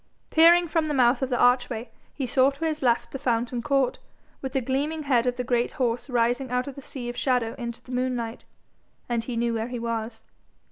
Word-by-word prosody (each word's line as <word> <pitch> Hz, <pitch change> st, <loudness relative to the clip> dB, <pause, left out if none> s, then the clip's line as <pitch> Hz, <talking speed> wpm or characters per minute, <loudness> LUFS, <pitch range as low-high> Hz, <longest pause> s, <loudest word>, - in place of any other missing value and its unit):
Peering 340 Hz, +2 st, +6 dB
from 320 Hz, -1 st, 0 dB
the 300 Hz, -, -1 dB
mouth 245 Hz, 0 st, +4 dB
of 265 Hz, -, 0 dB
the 245 Hz, -, 0 dB
archway, 245 Hz, -1 st, +2 dB, 0.2 s
he 275 Hz, -, -4 dB
saw 260 Hz, +2 st, +4 dB
to 280 Hz, +4 st, -5 dB
his 310 Hz, -1 st, -1 dB
left 240 Hz, -3 st, +1 dB
the 270 Hz, -, -5 dB
fountain 240 Hz, -2 st, -1 dB
court, 275 Hz, -1 st, +1 dB, 0.4 s
with 265 Hz, -1 st, -5 dB
the 270 Hz, -, +2 dB
gleaming 285 Hz, +5 st, -2 dB
head 250 Hz, -4 st, +2 dB
of 250 Hz, -, +1 dB
the 250 Hz, -, -3 dB
great 240 Hz, -1 st, 0 dB
horse 245 Hz, +1 st, -1 dB
rising 245 Hz, +1 st, +1 dB
out 250 Hz, 0 st, 0 dB
of 280 Hz, -, -5 dB
the 280 Hz, -, -10 dB
sea 255 Hz, -2 st, -6 dB
of 240 Hz, -, -4 dB
shadow 245 Hz, -3 st, 0 dB
into 235 Hz, -1 st, -6 dB
the 255 Hz, -, -12 dB
moonlight, 250 Hz, -2 st, -2 dB, 0.6 s
and 235 Hz, -1 st, -2 dB
knew 235 Hz, -1 st, 0 dB
where 225 Hz, 0 st, -2 dB
he 245 Hz, 0 st, -5 dB
was. 230 Hz, -1 st, -4 dB
250 Hz, 215 wpm, -26 LUFS, 235-270 Hz, 0.6 s, Peering